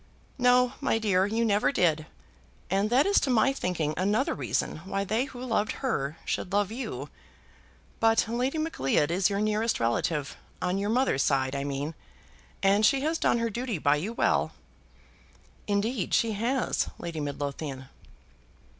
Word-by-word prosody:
"No, 250 0 +4
my - - +2
dear, 195 -4 +2
you 225 +2 0
never 210 +2 +2
did; 160 - +1 0.6
and 195 +2 +2
that 255 +4 +4
is 400 0 +4
to 275 - -1
my 250 +2 +3
thinking 170 - -2
another 205 - +1
reason - - -2
why 195 +4 -3
they 220 +6 0
who 260 -3 -10
loved 220 -3 0
her 150 - -1
should 180 - -2
love 205 0 +1
you. 250 +4 -5 0.9
But 225 0 +4
Lady 250 +6 -1
Macleod 165 - 0
is 185 +2 +2
your 200 0 -1
nearest 215 +2 0
relative, 135 +6 -1 0.2
on 180 +2 -1
your 200 +1 -1
mother's 240 - +2
side, 135 -1 +1
I 140 - -2
mean, 145 +3 -3 0.7
and 200 +2 +4
she 270 +5 +4
has 320 +3 0
done - - +2
her 230 -1 -1
duty 240 -2 -3
by 145 -1 +2
you 185 +9 -3
well." 235 - +1 1.1
"Indeed 205 0 0
she 230 - +2
has, 235 +5 0
Lady 170 -2 -5
Midlothian." 140 -1 -4
205 Hz, 155 wpm, -28 LUFS, 160-235 Hz, 1.1 s, No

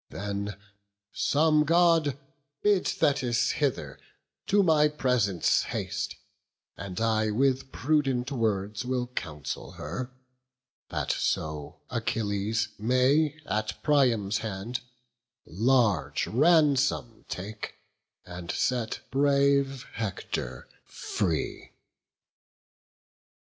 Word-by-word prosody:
Then, 100 0 -4 0.6
some 155 +1 +3
God 165 -3 +3 0.5
Bid 205 -3 +3
Thetis 120 -4 +1
hither 125 - -2 0.5
to 200 0 +4
my 155 -4 +5
presence 125 - +1
haste; - - -3 0.6
And 95 -2 -6
I 110 -1 +2
with 130 +4 +1
prudent 135 -3 0
words 105 -4 -1
will 125 0 -1
counsel 80 - -6
her, 105 - -5 0.8
That - - -1
so 75 -2 -2
Achilles 110 -2 -1
may 135 +7 +2
at 110 +2 -3
Priam's 115 -8 +2
hand 110 +2 -4 0.7
Large 115 +2 +2
ransom 140 -4 +3
take, 100 +4 -6 0.5
and 90 -1 -8
set 125 -3 -1
brave 140 -1 +2
Hector 110 -5 -4 0.2
free." - - -3
125 Hz, 85 wpm, -28 LUFS, 105-140 Hz, 0.8 s, my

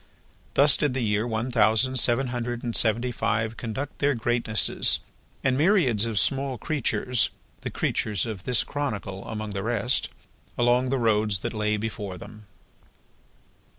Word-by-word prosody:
Thus 140 0 +7
did 145 -4 0
the 130 - -1
year 105 +1 0
one 115 +2 -2
thousand 120 +3 +3
seven 125 +2 +2
hundred 120 0 -4
and 120 -2 -2
seventy 120 +2 +2
five 115 -1 -1
conduct 125 +5 -6
their 140 -1 +2
Greatnesses, 115 -1 +1 0.4
and 130 -1 +2
myriads 145 - +3
of 110 -2 -3
small 135 +2 +1
creatures 125 -3 0 0.3
the - - -5
creatures 105 -4 -1
of 110 -5 -6
this 125 +3 +1
chronicle 105 -9 -4
among 110 -1 -5
the 100 -1 -3
rest 120 +3 0 0.5
along 125 +1 +2
the 135 - +1
roads 105 -5 +1
that - - -4
lay 105 -1 0
before 105 -3 -5
them. 105 +4 -12
115 Hz, 150 wpm, -25 LUFS, 110-130 Hz, 0.5 s, Thus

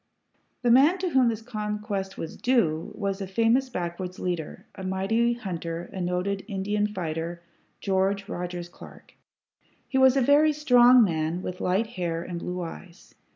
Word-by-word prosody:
The 240 - +4
man 285 +9 +6
to 370 -1 -2
whom 260 -5 +4
this 225 -1 -2
conquest 210 -4 -4
was 160 - -6
clue 170 -11 +1
was 200 -1 -3
a 195 - -4
famous 230 +6 +2
backwoods 180 -3 -5
leader, 175 -4 -4
a 190 - -9
mighty 195 +6 +1
hunter, 170 -6 -5
a 190 - -4
noted 180 +3 -1
Indian 205 0 -1
fighter, 170 -3 -4 0.4
George 195 +1 0
Rogers 175 -4 -5
Clark. 175 - -15 0.7
He 265 - 0
was 265 0 +6
a - - +4
very 295 +4 +5
strong 250 -4 +6
man, 165 -1 -1
with 180 0 -5
light 190 +5 +1
hair 175 -7 -3
and 175 -1 -5
blue 180 +1 -4
eyes. 175 +2 -10
195 Hz, 155 wpm, -26 LUFS, 175-235 Hz, 0.7 s, man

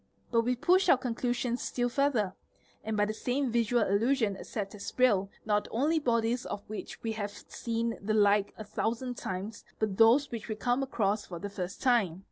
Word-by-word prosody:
But 230 -1 +4
we 250 +2 0
push 360 +8 +3
our 275 - +7
conclusions 245 0 -1
still 245 -1 -1
further, 245 -7 +1 0.5
and 220 0 -2
by 205 - +3
the 215 - -2
same 250 +3 -1
visual 235 0 +2
illusion 220 +1 +2
accept 195 0 -5
as 205 -1 -6
real 205 -7 +3 0.2
not 210 -1 +1
only 300 +8 +1
bodies 235 -2 +1
of 205 - -6
which 215 - -7
we 225 - -1
have 210 -2 -3 0.2
seen 230 0 -2
the 215 +2 0
like 205 -1 +4
a 215 - -6
thousand 225 +4 -2
times, 195 +4 -5
but 210 -3 -1
those 240 +6 +5
which 230 -3 -5
we 215 - -3
come 245 +4 0
across 215 -6 0
for 175 - -6
the 200 +3 -6
first 185 -1 -5
time. 210 -9 +2
225 Hz, 190 wpm, -30 LUFS, 205-245 Hz, 0.5 s, our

